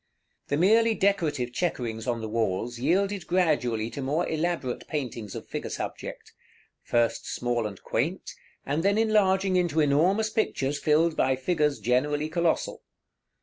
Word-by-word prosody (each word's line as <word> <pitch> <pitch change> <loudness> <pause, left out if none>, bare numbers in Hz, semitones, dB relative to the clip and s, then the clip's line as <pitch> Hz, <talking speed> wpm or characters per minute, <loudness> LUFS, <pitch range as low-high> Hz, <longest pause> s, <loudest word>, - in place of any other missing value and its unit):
The 145 - 0
merely 225 +6 +4
decorative 155 -12 0
chequerings 120 -9 -2
on 120 -2 -1
the 110 - -4
walls 115 +2 -1
yielded 190 +7 0
gradually 125 -11 +1
to 140 - -5
more 150 +6 0
elaborate 160 -5 -2
paintings 120 - -4
of - - -7
figure - - -5
subject; - - -6 0.5
first 120 -1 0
small 120 -2 -1
and 100 -3 -9
quaint, 160 +11 -2 0.3
and 145 +4 0
then 200 +3 +2
enlarging 195 -4 +3
into 170 -3 +1
enormous 175 +9 +3
pictures 145 -10 -1
filled 155 +2 +2
by 130 - +2
figures 150 +1 0
generally 145 +5 +1
colossal. 170 0 0
150 Hz, 140 wpm, -27 LUFS, 125-180 Hz, 0.5 s, merely